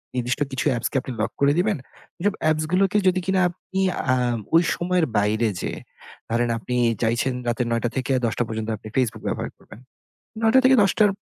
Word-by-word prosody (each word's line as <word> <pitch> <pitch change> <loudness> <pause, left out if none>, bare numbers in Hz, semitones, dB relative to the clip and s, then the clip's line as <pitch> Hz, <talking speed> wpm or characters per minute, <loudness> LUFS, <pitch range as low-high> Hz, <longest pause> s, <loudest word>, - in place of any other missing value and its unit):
নির্দিষ্ট 125 +3 -1
কিছু 130 - -2
apps 115 - -1
কে - - -12
আপনি 130 - -7
lock 110 - -1
করে 140 0 +5
দিবেন। 205 +1 +1 0.5
যেব 205 - +3 0.2
apps 155 0 +1
গুলোকে 195 +2 +3
যদি 185 0 +3
কিনা 190 -1 +2
আপনি, 185 +2 -6 0.3
আম 120 -2 0 0.2
ওই 165 - +6
সময়ের 180 -1 +1
বাইরে 105 +3 +2
যেয়ে, - - -4 0.5
ধরেন 120 +1 +1
আপনি 125 +2 -4 0.3
চাইছেন 115 +3 +1
রাতের 120 0 0
৯ঃ০০ 115 +1 0
থেকে 130 +1 -1
১০ঃ০০ 115 +1 0
পর্যন্ত 110 0 -4
আপনি 105 - -12
Facebook 115 -4 0
ব্যবহার - - -2
করবেন। - - -15 0.6
৯ঃ০০ 225 +3 +5
থেকে 260 0 +7
১০ঃ০০ 200 +2 +3
র - - 0
130 Hz, 185 wpm, -23 LUFS, 115-180 Hz, 0.6 s, থেকে